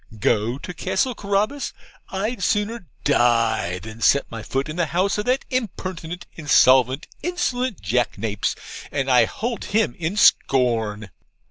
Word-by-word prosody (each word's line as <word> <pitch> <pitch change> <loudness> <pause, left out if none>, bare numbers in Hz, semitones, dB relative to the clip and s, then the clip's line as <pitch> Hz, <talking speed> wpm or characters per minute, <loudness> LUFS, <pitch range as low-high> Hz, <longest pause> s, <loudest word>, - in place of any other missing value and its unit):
Go 110 +4 +1
to 180 - -7
Castle 190 +8 0
Carabas! 210 +7 -1 0.4
I'd 205 +4 -3
sooner 210 +1 -1 0.2
die 110 -6 +2
than 110 +4 -10
set 140 +3 +4
my 115 -1 -6
foot 135 +5 -2
in 155 - -5
the 170 -2 0
house 185 +6 0
of 210 - -2
that 255 +2 +1
impertinent, 185 -8 -4
insolvent, 130 -3 +4 0.2
insolent 255 - -2
jackanapes 110 -1 -1 0.4
and 135 -2 0
I 125 -2 +6
hold 230 - -4
him 220 +1 +1
in 170 +5 -2
scorn!' 115 - +2
160 Hz, 135 wpm, -22 LUFS, -, 0.4 s, I